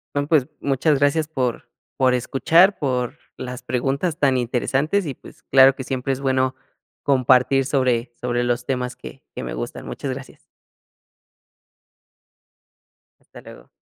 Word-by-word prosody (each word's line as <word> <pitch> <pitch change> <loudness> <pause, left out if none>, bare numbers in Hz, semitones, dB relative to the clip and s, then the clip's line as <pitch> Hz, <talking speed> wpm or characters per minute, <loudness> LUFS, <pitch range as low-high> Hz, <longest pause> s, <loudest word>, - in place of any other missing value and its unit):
No, 145 0 0
pues, 150 -4 +3
muchas 140 +1 +1
gracias 145 +2 +2
por 130 -6 -3 0.3
por 130 -1 +3
escuchar, 165 +10 +3
por 125 -4 -1 0.2
las 125 0 -7
preguntas 135 +6 -1
tan 135 -4 +2
interesantes, 135 +9 0
y 145 - -3
pues, - - -16
claro 135 0 +7
que 135 - -6
siempre 130 +1 -2
es 135 - -6
bueno 130 -1 +1 0.5
compartir 130 0 +3
sobre 125 -3 0
sobre 120 0 0
los 120 0 -1
temas 125 -2 -2
que 130 +2 -12
que - - -5
me - - -5
gustan. - - -6
Muchas 135 - -5
gracias. 135 0 -9 2.9
Hasta - - -12
luego. - - -14
130 Hz, 140 wpm, -22 LUFS, 125-140 Hz, 2.9 s, claro